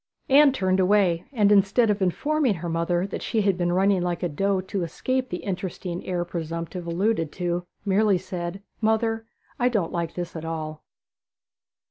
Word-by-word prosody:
Anne 280 +1 +7
turned 190 -6 +1
away, 185 -3 +3
and 210 -6 +3
instead 205 +3 +4
of 205 -1 -2
informing 265 - +1
her 170 +1 -5
mother 170 +2 0
that 200 - -5
she 225 - 0
had 195 -2 +3
been 175 -1 0
running 190 +1 +3
like 175 0 -2
a 175 - +1
doe 195 +5 0
to 190 +1 -3
escape 255 +10 -2
the 180 - -5
interesting 180 -2 -4
heir 175 -1 -1
presumptive 170 +1 -5
alluded 170 -2 0
to, 175 0 -2 0.2
merely 200 0 +3
said 180 +1 -5 0.2
'Mother, 225 0 +1 0.3
I 245 0 +3
don't 210 -9 0
like 170 -2 -3
this 175 -1 -5
at 160 - -5
all.' 155 -1 -5
185 Hz, 170 wpm, -25 LUFS, 175-210 Hz, 0.3 s, Anne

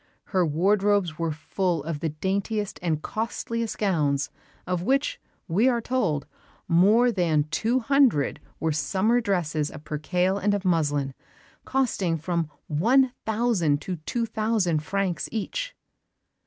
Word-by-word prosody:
Her 185 -1 +4
wardrobes 190 +1 +2
were 165 -1 0
full 170 +1 -1
of 160 -1 -4
the 160 - -1
daintiest 200 +6 -2
and 160 -3 -1
costliest 230 0 -3
gowns 150 -9 +1 0.3
of 180 -1 -1
which, 270 +8 0 0.3
we 210 +10 +3
are 240 -2 +1
told, 205 - 0 0.4
more 210 +8 +5
than 165 -7 +2
two 235 +8 +1
hundred 245 - +3 0.2
were 160 - 0
summer 190 - +1
dresses 160 -8 0
of 150 - -10
percale 180 +6 0
and 205 0 +2
of 200 -1 -4
muslin, 145 -6 +1 0.5
costing 205 -11 0
from 165 0 -2 0.2
one 245 - +3 0.2
thousand 210 -10 +2
to 185 -2 -3
two 230 +9 -2
thousand 215 -8 0
francs 190 +1 -2
each. - - -3
185 Hz, 130 wpm, -26 LUFS, 155-220 Hz, 0.5 s, more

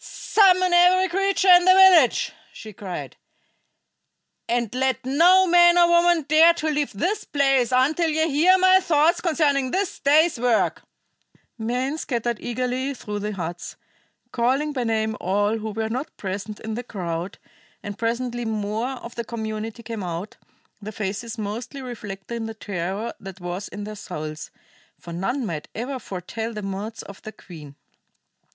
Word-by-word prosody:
"Summon 370 -3 +3
every 365 +2 +5
creature 390 +1 +1
in 355 0 +8
the 370 +1 +6
village," 370 -9 +5 0.2
she 215 -1 -11
cried, 190 -2 -7 1.3
"and 235 -2 -1
let 260 0 -1
no 350 +8 +5
man 345 0 +5
or 345 -1 +6
woman 345 -1 +3
dare 315 +4 +5
to 315 -2 -2
leave 295 -1 -1
this 355 - -2
place 270 -3 +1
until 295 +6 +2
ye 315 +1 +1
hear 330 +6 +4
my 375 0 +5
thoughts 335 -2 +2
concerning 290 -6 +1
this 390 +6 -2
day's 300 0 +3
work!" 240 -2 +1 0.8
Men 250 +7 -2
scattered 235 -4 -2
eagerly 255 +3 -3
through 210 -4 -6
the 210 +1 -4
huts, 175 -2 -6 0.6
calling 265 +5 0
by 255 -3 -2
name 220 -1 -1
all 205 +4 0
who 220 0 -5
were 220 +1 -3
not 255 +6 -5
present 200 +2 -5
in 220 0 -5
the 235 - -3
crowd, 180 -6 -5 0.5
and 205 -1 -6
presently 240 +1 -2
more 220 +3 -2
of 235 - -8
the 235 - -4
community 220 0 -6
came 225 -2 -6
out, 175 +2 -5 0.5
their 210 +1 -7
faces 210 +3 -5
mostly 225 +6 -5
reflecting 225 -2 -6
the 225 - -7
terror 200 +2 -4
that 195 -1 -10
was 180 +2 -5
in 205 - -8
their 215 +1 -6
souls; 155 -6 -7 0.5
for 170 - -10
none 240 +10 -2
might 155 -7 -5
ever 255 +4 -4
foretell 220 +3 -6
the 210 -1 -6
moods 200 +3 -5
of 200 - -12
their 215 - -8
queen. 150 -6 -13
235 Hz, 155 wpm, -23 LUFS, 210-305 Hz, 1.3 s, in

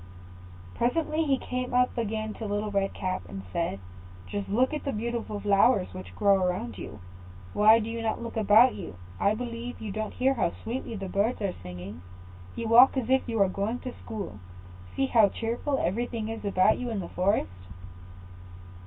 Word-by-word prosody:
] 90 0 -17
Presently 310 +5 +1
he 275 -2 +2
came 250 -1 -3
up 250 0 +3
again 220 -1 -2
to 220 - -6
Little 205 +1 -2
Red 195 -1 +1
Cap, 185 0 -3
and 95 +1 -7
said, 165 - -1 0.5
"Just 205 -1 -4
look 250 +8 +2
at 300 - -3
the 275 - -1
beautiful 230 -2 -3
flowers 200 - +3
which 90 0 -9
grow 195 - +4
around 180 - -2
you; 105 - -8 0.5
why 215 +2 +7
do 225 -1 -2
you 230 0 -4
not 225 -1 -1
look 235 -1 -6
about 220 +3 +6
you? - - -7 0.2
I 205 +2 +3
believe 240 +1 -5
you 215 -2 -5
don't 215 +2 -4
hear 265 +2 +3
how 225 -9 0
sweetly 230 0 -4
the 195 -2 -5
birds 200 +6 0
are 195 -2 0
singing. 90 0 -8 0.5
You 230 - -3
walk 245 +4 +7
as 255 -1 -1
if 265 -1 +2
you 225 - -1
were 200 -2 +5
going 200 +5 -2
to 255 - -6
school; 200 - -7 0.6
see 270 - +2
how 225 -6 +5
cheerful 240 +7 -2
everything 230 +1 -2
is 225 0 -5
about 200 +1 +3
you 250 -1 -3
in 220 -3 -2
the 180 - -5
forest." 135 - -1
215 Hz, 190 wpm, -28 LUFS, 190-240 Hz, 0.6 s, why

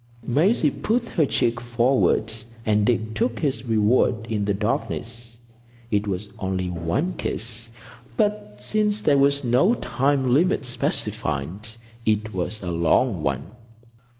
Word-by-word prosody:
Maisie 155 - +3
put 235 - -1
her 155 -5 +2
cheek 120 -1 0
forward, 120 -2 +1 0.3
and 105 -1 +2
Dick 110 -2 0
took 115 +2 0
his 135 -3 -2
reward 110 0 +2
in 105 -2 0
the 100 - +1
darkness. 115 +2 -3 0.5
It 105 0 +1
was 100 +1 -3
only 95 -2 -2
one 90 - -1
kiss, 115 0 -4 0.5
but, 205 - -1
since 210 - 0
there 140 -2 +4
was 140 +1 +3
no 130 - +3
time 135 - +1
limit 160 0 +2
specified, 90 - -2 0.4
it 110 -1 0
was 95 +3 -3
a 90 - -3
long 85 +4 +2
one. 75 +4 -2
115 Hz, 130 wpm, -23 LUFS, 105-140 Hz, 0.5 s, there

